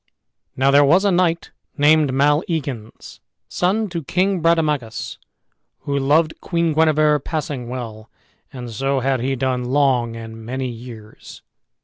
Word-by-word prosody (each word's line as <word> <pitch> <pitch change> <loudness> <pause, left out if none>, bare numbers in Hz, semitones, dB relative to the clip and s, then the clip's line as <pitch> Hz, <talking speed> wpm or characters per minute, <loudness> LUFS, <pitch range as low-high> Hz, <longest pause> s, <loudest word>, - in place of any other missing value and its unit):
Now 135 +1 +3
there 145 +1 +6
was 175 +8 +4
a 200 - +3
knight 175 -2 +1 0.3
named 150 -1 +4
Maleagans, 140 - -1 0.3
son 205 +5 0
to 170 -2 -4
King 185 +5 0
Brademagus, 150 -8 0 0.6
who 140 - -3
loved 150 +4 +1
Queen 170 -2 0
Guenever 155 -1 +3
passing 140 -4 -4
well, 115 -3 -7 0.4
and 125 -2 -8
so 135 +4 -1
had 135 0 0
he 135 +3 -1
done 130 -1 -1
long 125 -3 +1
and 115 0 -9
many 130 +2 -4
years. 115 -2 -11
140 Hz, 130 wpm, -20 LUFS, 125-160 Hz, 0.6 s, there